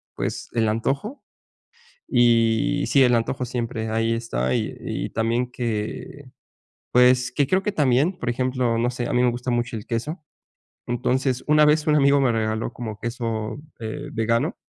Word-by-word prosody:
pues -, -, -4 dB
el 115 Hz, -2 st, +2 dB
antojo. 140 Hz, -, -2 dB, 0.8 s
Y 120 Hz, +3 st, +3 dB
sí, 135 Hz, -, +5 dB
el 125 Hz, -1 st, +4 dB
antojo 120 Hz, +3 st, -1 dB
siempre 115 Hz, -2 st, -3 dB
ahí 115 Hz, +1 st, +1 dB
está 65 Hz, -, -1 dB
y -, -, -2 dB
y -, -, -4 dB
también 115 Hz, +2 st, -1 dB
que 120 Hz, +3 st, -4 dB, 0.6 s
pues, 125 Hz, 0 st, +5 dB
que 145 Hz, -, +2 dB
creo 185 Hz, +7 st, +1 dB
que 210 Hz, +1 st, -2 dB
también, 150 Hz, +3 st, +2 dB
por 125 Hz, -, -3 dB
ejemplo, 125 Hz, -1 st, 0 dB
no 120 Hz, +1 st, +1 dB
sé, 125 Hz, -1 st, -4 dB
a -, -, -3 dB
mí 125 Hz, -, +2 dB
me 125 Hz, -, +4 dB
gusta 125 Hz, +1 st, -3 dB
mucho 120 Hz, 0 st, -1 dB
el 105 Hz, -, -6 dB
queso. 150 Hz, +9 st, -4 dB, 0.6 s
Entonces, 125 Hz, +1 st, 0 dB
una 150 Hz, 0 st, +5 dB
vez 150 Hz, +1 st, +3 dB
un 150 Hz, -2 st, +3 dB
amigo 140 Hz, 0 st, +4 dB
me 130 Hz, -3 st, +3 dB
regaló 110 Hz, 0 st, -1 dB
como 110 Hz, -4 st, -6 dB
queso, 115 Hz, 0 st, -3 dB, 0.2 s
eh, 145 Hz, +7 st, -5 dB
vegano 115 Hz, -, 0 dB
120 Hz, 170 wpm, -23 LUFS, 115-135 Hz, 0.8 s, sí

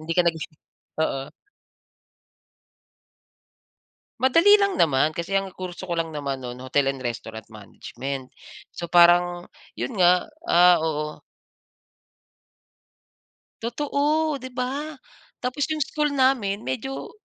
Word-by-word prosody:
hindi 165 Hz, +1 st, -3 dB
ka -, -, +7 dB
nag-i 165 Hz, -1 st, +1 dB, 0.6 s
oo. 135 Hz, -4 st, 0 dB, 3.0 s
Madali 335 Hz, +11 st, +6 dB
lang 400 Hz, -1 st, +1 dB
naman, 150 Hz, -, +2 dB
kasi 170 Hz, +3 st, -5 dB
ang 195 Hz, 0 st, +1 dB
kurso 185 Hz, 0 st, -7 dB
ko 170 Hz, -, -2 dB
lang 165 Hz, -1 st, -2 dB
naman 140 Hz, -3 st, -4 dB
no'n, 125 Hz, 0 st, -7 dB
Hotel 135 Hz, +1 st, +1 dB
and 135 Hz, -, -10 dB
Restaurant 110 Hz, -3 st, -6 dB
Management. 125 Hz, +5 st, -7 dB, 0.5 s
So 170 Hz, -1 st, -6 dB
parang 175 Hz, 0 st, +5 dB, 0.3 s
yun 240 Hz, -, -3 dB
nga, 180 Hz, -1 st, +4 dB, 0.2 s
ah, 180 Hz, -, +6 dB
oo. 150 Hz, -1 st, -3 dB, 2.4 s
Totoo, 290 Hz, +5 st, 0 dB
'di 260 Hz, +1 st, -8 dB
ba? 280 Hz, +5 st, -3 dB, 0.5 s
Tapos 255 Hz, +4 st, -1 dB
yung 310 Hz, -1 st, 0 dB
school 300 Hz, +1 st, -1 dB
namin 245 Hz, -7 st, +1 dB
medyo 265 Hz, +2 st, -5 dB
180 Hz, 110 wpm, -24 LUFS, -, 3.0 s, ka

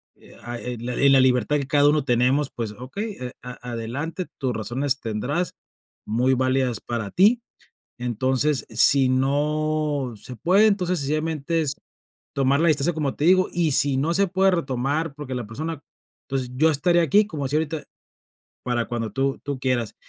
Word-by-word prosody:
eh -, -, -16 dB
ah 120 Hz, 0 st, -4 dB
eh 125 Hz, 0 st, -4 dB
ah, -, -, -11 dB
la 125 Hz, 0 st, -1 dB
li 140 Hz, -, +5 dB
la 135 Hz, -1 st, +6 dB
libertad 130 Hz, +2 st, +2 dB
que 140 Hz, -, -4 dB
cada 145 Hz, +1 st, +4 dB
uno 150 Hz, -1 st, +2 dB
tenemos, 130 Hz, +3 st, +2 dB
pues, 115 Hz, -3 st, -4 dB
okey, 195 Hz, -, -6 dB
eh, 125 Hz, -1 st, -5 dB
a 125 Hz, 0 st, -8 dB
adelante, 135 Hz, +10 st, -4 dB
tus 130 Hz, -3 st, -1 dB
razones 125 Hz, +6 st, -1 dB
tendrás, 115 Hz, +11 st, -2 dB, 0.5 s
muy 125 Hz, +5 st, +1 dB
válidas 130 Hz, -2 st, +1 dB
para 115 Hz, -4 st, -4 dB
ti. 215 Hz, +6 st, +4 dB, 0.6 s
Entonces, 130 Hz, +3 st, 0 dB
si 130 Hz, +4 st, +6 dB
no 145 Hz, 0 st, 0 dB
se 125 Hz, +4 st, -8 dB
puede, 190 Hz, +5 st, +4 dB
entonces, 185 Hz, -3 st, 0 dB
sencillamente, 155 Hz, +2 st, -1 dB
es 145 Hz, -2 st, -1 dB, 0.6 s
tomar 140 Hz, +1 st, +2 dB
la 170 Hz, -, +3 dB
distancia, 155 Hz, +2 st, +2 dB
como 150 Hz, -3 st, -2 dB
te 150 Hz, -, -1 dB
digo 185 Hz, +1 st, +4 dB
y, 170 Hz, -3 st, 0 dB
si 140 Hz, 0 st, +3 dB
no 155 Hz, +5 st, 0 dB
se 200 Hz, +2 st, +2 dB
puede 190 Hz, +1 st, +2 dB
retomar, 145 Hz, -1 st, -2 dB
porque 145 Hz, -3 st, -7 dB
la 120 Hz, -4 st, -5 dB
persona 155 Hz, +6 st, -5 dB, 0.5 s
entonces, 130 Hz, -2 st, -3 dB
yo 155 Hz, +5 st, +4 dB
estaré 170 Hz, +4 st, +2 dB
aquí, 200 Hz, +7 st, +4 dB
como 155 Hz, -8 st, -5 dB
así 135 Hz, +3 st, -2 dB
ahorita, 160 Hz, 0 st, -3 dB, 0.8 s
para 120 Hz, -2 st, -1 dB
cuando 115 Hz, -3 st, -3 dB
tú 135 Hz, +4 st, -1 dB
tú 140 Hz, -1 st, -4 dB
quieras. 125 Hz, -4 st, -1 dB
140 Hz, 175 wpm, -23 LUFS, 125-155 Hz, 0.8 s, la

